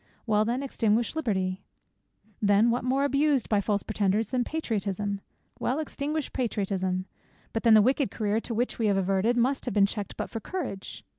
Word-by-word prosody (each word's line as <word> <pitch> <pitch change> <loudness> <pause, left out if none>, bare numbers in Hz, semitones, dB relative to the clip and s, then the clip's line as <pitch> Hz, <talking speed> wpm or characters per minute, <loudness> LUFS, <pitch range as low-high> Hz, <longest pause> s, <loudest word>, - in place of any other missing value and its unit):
Well 215 -2 +2
then, 245 +4 -1
extinguish 230 -2 +1
Liberty. 190 -10 -1 0.8
Then 205 +3 +4
what 240 +1 -1
more 265 +2 +1
abused 285 -2 +2
by 210 -2 +3
false 205 0 0
pretenders, 210 0 0
than 250 -2 +1
Patriotism? 205 - -2 0.4
Well, 255 - 0
extinguish 305 -1 -3
Patriotism. 190 -6 -1 0.5
But 225 - -1
then 225 -1 +6
the 215 - +7
wicked 265 +3 +2
career 215 0 0
to 230 0 -5
which 245 +2 -1
we 225 - +2
have 200 -1 +2
adverted, 195 +5 +1
must 260 +3 +1
have 245 - -3
been 200 -1 +6
checked 205 -1 -5
but - - -2
for 225 - -3
Courage. 195 - -6
220 Hz, 175 wpm, -27 LUFS, 200-255 Hz, 0.8 s, the